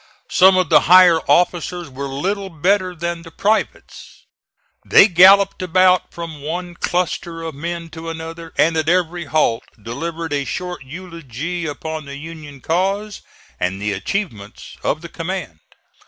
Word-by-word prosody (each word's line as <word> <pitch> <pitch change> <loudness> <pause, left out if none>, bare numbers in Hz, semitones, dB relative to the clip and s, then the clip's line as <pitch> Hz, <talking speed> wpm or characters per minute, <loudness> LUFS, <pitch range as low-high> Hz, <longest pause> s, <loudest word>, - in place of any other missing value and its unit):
Some 185 +1 +6
of 185 -3 +1
the 160 - +7
higher 180 -2 +8
officers 175 -1 +1
were 140 +1 -6
little 190 +9 -3
better 185 +3 0
than 170 0 -4
the 165 - -12
privates. 215 +6 -3 0.6
They 195 - +7
galloped 195 +2 +6
about 185 0 +3
from 165 -3 -8
one 175 +4 -5
cluster 170 -1 -2
of 160 -1 -5
men 170 +3 -5
to 165 +1 -8
another 165 0 -7
and 165 +1 +3
at 160 0 0
every 175 -1 0
halt 140 -6 +1 0.2
delivered 160 +8 -5
a 140 -1 0
short 180 +3 -5
eulogy 170 +1 -6
upon 155 +1 -5
the 140 0 -8
Union 150 -3 -10
cause 195 +5 -1 0.4
and 95 +2 -2
the 105 +1 -2
achievements 105 - -5
of 155 - -1
the 170 - -8
command. 165 - -5
170 Hz, 145 wpm, -19 LUFS, 155-180 Hz, 0.6 s, higher